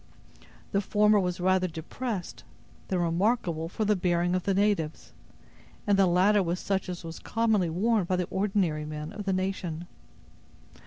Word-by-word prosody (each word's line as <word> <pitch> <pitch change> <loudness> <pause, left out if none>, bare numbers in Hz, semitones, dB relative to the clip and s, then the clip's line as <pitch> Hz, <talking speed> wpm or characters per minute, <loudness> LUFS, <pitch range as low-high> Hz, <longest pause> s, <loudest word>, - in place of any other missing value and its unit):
The 200 - +2
former 210 +1 +3
was 180 -2 -1
rather 185 0 +2
depressed, 180 +5 -5 0.4
than 185 - 0
remarkable 170 -1 0
for 215 +4 -2
the 210 0 +3
bearing 175 -1 +1
of 185 -1 -1
the 195 -1 +1
natives; 195 -6 0 0.7
and 205 -2 +3
the 195 -1 +4
latter 190 +4 +4
was 175 0 -1
such 195 -2 -2
as 180 -1 -5
was 165 0 -7
commonly 220 -6 +1
worn 205 +4 +1
by 185 - 0
the 180 -1 0
ordinary 190 -6 0
men 150 0 -6
of 205 - -6
the 195 - +1
nation. 185 -3 -2
185 Hz, 160 wpm, -28 LUFS, 170-205 Hz, 0.7 s, the